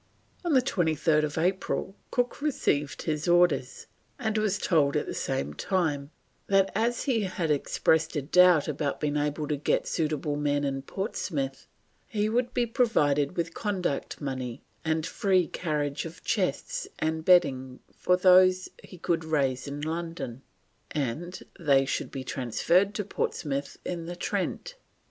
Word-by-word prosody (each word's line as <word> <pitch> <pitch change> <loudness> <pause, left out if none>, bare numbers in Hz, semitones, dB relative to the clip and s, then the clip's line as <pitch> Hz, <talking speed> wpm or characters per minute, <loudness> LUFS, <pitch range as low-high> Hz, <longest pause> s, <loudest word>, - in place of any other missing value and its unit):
On 345 - 0
23rd 160 - +2
April 190 +2 -1
Cook 245 +2 -1
received 150 - 0
his 155 -1 -2
orders, 175 -7 +2 0.3
and 220 -4 -2
was 215 -2 +1
told 150 -8 +2
at - - -1
the - - -5
same 70 +2 -2
time 145 - -1 0.4
that 195 -1 +3
as 235 +3 0
he 250 -6 +1
had 175 -4 -1
expressed 160 +2 +1
a 145 - -1
doubt 180 0 +5
about 145 -1 -2
being 150 -1 -1
able 150 +1 -1
to 150 - 0
get 145 - 0
suitable 150 -2 -1
men 145 0 0
in 135 -1 -1
Portsmouth, 150 - -4 0.4
he 210 -1 0
would 245 +2 0
be 245 -1 +1
provided 165 - +1
with 170 0 -1
conduct 190 -9 -2
money 130 -3 -4 0.2
and 160 0 0
free 190 -3 +2
carriage 150 -4 -2
of 165 +1 -9
chests - - -1
and 160 0 -1
bedding 135 -8 +3 0.2
for 180 - +2
those 185 0 +5
he 185 - -12
could 165 -1 -1
raise 140 -5 0
in 145 +1 -5
London, 160 -6 -4 0.5
and 155 +6 -3 0.2
they 140 -5 +4
should 135 - -2
be 135 - -6
transferred 165 - +1
to 210 - -1
Portsmouth 140 -7 -3
in 170 -2 -4
the 175 - -5
Trent. - - -3
160 Hz, 145 wpm, -28 LUFS, 145-185 Hz, 0.5 s, doubt